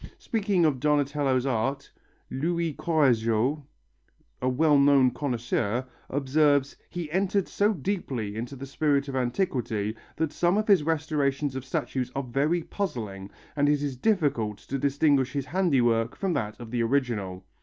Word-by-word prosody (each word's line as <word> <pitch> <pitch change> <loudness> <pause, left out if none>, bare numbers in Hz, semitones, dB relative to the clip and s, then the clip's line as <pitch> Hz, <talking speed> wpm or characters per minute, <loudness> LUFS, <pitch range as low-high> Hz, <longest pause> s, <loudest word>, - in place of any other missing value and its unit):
Speaking 200 -6 +1
of 145 -5 +1
Donatello's 145 -2 +1
art 135 +2 -1 0.4
Louis 165 +3 -1
Courajod, 130 -3 +2 0.8
a 130 - +1
well 145 +3 +4
known 140 -2 +5
connoisseur, 120 -3 -1 0.2
observes: 140 0 +2
"He 170 -4 -5
entered 195 +2 +1
so 205 +1 +2
deeply 135 - -3
into 120 +5 -5
the 135 +1 -7
spirit 140 0 0
of 135 - -4
antiquity, 120 - -1 0.2
that 160 -2 -1
some 175 +3 +2
of 215 - 0
his 200 -6 +6
restorations 150 -3 0
of 130 - -4
statues 130 -3 -3
are 135 - -1
very 145 +7 0
puzzling, 105 - -4 0.3
and 145 0 +2
it 145 -1 +2
is 140 -3 -2
difficult 130 - 0
to 135 +6 -5
distinguish 140 -1 +2
his 140 -2 -2
handiwork 125 -11 +1
from 190 -3 -1
that 105 -6 -3
of 115 -2 -9
the 120 -1 0
original." 115 -7 -1
140 Hz, 145 wpm, -27 LUFS, 125-155 Hz, 0.8 s, his